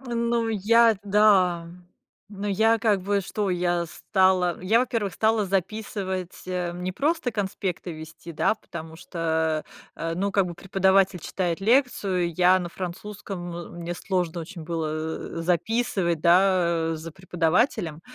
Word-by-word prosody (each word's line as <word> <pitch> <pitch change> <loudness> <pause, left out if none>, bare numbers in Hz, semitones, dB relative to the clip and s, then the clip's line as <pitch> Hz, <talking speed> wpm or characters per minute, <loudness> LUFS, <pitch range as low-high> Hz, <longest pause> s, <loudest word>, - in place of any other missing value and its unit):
Ну, 235 -2 -1
я, 225 +2 +4
да, 190 -5 +3 0.6
ну, 205 0 -5
я 225 +3 +3
как 210 -5 +2
бы 200 +1 +1
что, 195 +1 -2
я 175 -1 0
стала. 185 0 +1
Я, 220 +6 +3
во-первых, 225 -6 -1
стала 220 -1 +2
записывать, 190 -1 -3
э, 180 -1 -2
не 180 +1 -3
просто 290 - 0
конспекты 195 -4 -3
вести, 160 +1 -10
да, 165 - +1
потому 160 -5 -9
что, 160 -2 -1 0.3
э, 165 0 -3
ну, 200 +2 -1
как 195 -2 +3
бы 175 - -6
преподаватель 190 0 +2
читает 175 +1 -2
лекцию, 195 - +1
я 180 +2 +5
на 175 -2 -4
французском, 180 0 -6
м 175 - -8
мне 175 0 -4
сложно 180 -2 -2
очень 165 0 -8
было, 165 -1 -2 0.5
э, - - -3
записывать, 180 -1 0
да, 170 -2 +3
за 160 0 -8
преподавателем. 175 - 0
185 Hz, 140 wpm, -25 LUFS, 170-205 Hz, 0.6 s, я